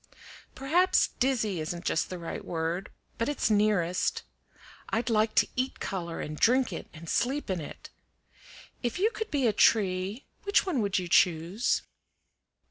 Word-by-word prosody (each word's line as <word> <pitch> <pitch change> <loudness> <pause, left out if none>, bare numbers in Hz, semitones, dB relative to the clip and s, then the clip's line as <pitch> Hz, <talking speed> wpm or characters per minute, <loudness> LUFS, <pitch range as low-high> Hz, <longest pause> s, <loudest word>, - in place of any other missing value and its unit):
"Perhaps 350 +7 +3
dizzy 225 -8 +1
isn't 170 +2 -4
just 165 - 0
the 185 - -5
right 170 -1 -6
word, 165 +3 -3 0.3
but 230 - 0
it's 290 -6 0
nearest. 205 -4 +1 0.7
I'd 235 +2 -1
like 215 0 +2
to - - +5
eat 255 +1 -2
color, 170 -3 -4
and 150 0 -6
drink 250 -3 +3
it, - - -6
and 165 +1 -11
sleep 265 - 0
in 180 -3 -2
it. 145 - -10 0.9
If 240 -2 -2
you 420 +5 +2
could 440 -2 -5
be 280 -4 0
a 220 - +3
tree, 195 +3 +2 0.2
which 405 -1 +2
one 330 -11 0
would 200 -1 0
you 180 -2 -2
choose?" 180 +5 +2
210 Hz, 155 wpm, -28 LUFS, 175-255 Hz, 0.9 s, to